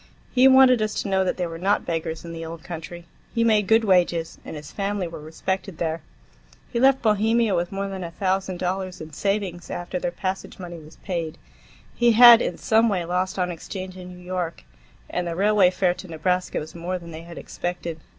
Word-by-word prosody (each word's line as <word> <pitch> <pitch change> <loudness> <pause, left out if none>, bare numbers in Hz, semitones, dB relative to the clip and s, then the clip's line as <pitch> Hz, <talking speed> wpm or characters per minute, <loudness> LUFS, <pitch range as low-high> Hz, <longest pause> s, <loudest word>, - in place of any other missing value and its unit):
He 255 +1 +6
wanted 260 -3 +7
us 215 -1 -1
to - - -5
know 190 -1 +2
that 185 - -1
they 180 - -1
were 165 -1 -6
not 195 +3 +1
beggars 165 0 -3
in 170 - -7
the 165 0 -6
old 165 0 -8
country; 170 0 -8 0.3
he 230 - +3
made 215 -3 +3
good 225 +1 +5
wages, 175 -4 +2
and - - -8
his 150 0 -9
family 200 -2 -2
were 165 -2 -8
respected 190 +4 -4
there. 165 -1 -2 0.7
He 235 - +1
left 265 0 +4
Bohemia 220 0 +3
with 175 0 -1
more 195 0 -3
than 190 -1 -5
a 170 - -5
thousand 190 +1 -1
dollars 185 +1 -3
in 155 -1 -9
savings, 195 -1 -2
after 175 +1 -4
their 175 - -1
passage 185 +2 -4
money 175 -2 -8
was 155 +1 -14
paid. 170 -5 -3 0.6
He 240 -1 +3
had 240 0 +10
in - - -2
some 225 +1 +3
way 185 -4 -1
lost 185 +2 -1
on 180 -1 0
exchange 185 +2 -7
in 180 -1 -9
New 180 0 -12
York, 180 - -3 0.4
and 180 0 -3
the 170 - -3
railway 200 0 +4
fare 180 -1 +1
to 185 - -10
Nebraska 180 +3 -1
was 155 +1 -5
more 175 +2 -3
than 170 -1 -10
they 160 0 -8
had 170 0 -11
expected. 175 -2 -5
180 Hz, 210 wpm, -24 LUFS, 170-200 Hz, 0.7 s, had